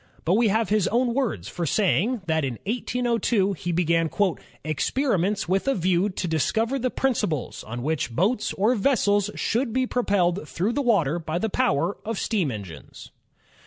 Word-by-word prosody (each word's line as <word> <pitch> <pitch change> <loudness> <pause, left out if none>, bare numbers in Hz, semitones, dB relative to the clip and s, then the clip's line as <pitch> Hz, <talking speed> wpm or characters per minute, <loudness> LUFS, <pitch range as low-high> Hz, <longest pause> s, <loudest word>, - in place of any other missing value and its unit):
But 170 - +3
we 225 +3 +4
have 220 0 +1
his 210 -2 +2
own 240 +1 +1
words 230 - -1
for 170 +9 -3
saying 210 - +1
that 160 -2 0
in 130 -4 -2
1802 235 -3 0
he 175 0 -4
began 165 -1 +1 0.5
"experiments 195 - 0
with 190 +7 0
a 275 - +2
view 185 +2 +1
to 185 -1 -4
discover 225 - 0
the 255 +1 0
principles 210 - -1
on 120 +2 -6
which 155 -3 -1
boats 195 - 0
or 215 +5 +2
vessels 205 -4 +2
should 235 +1 0
be 260 +2 +1
propelled 195 -9 0
through 200 +7 -1
the 285 - 0
water 175 - +2
by 160 0 -3
the 220 +5 -1
power 195 - +1
of 225 -1 -3
steam 195 -10 0
engines." 95 - -9
200 Hz, 165 wpm, -25 LUFS, 165-235 Hz, 0.5 s, we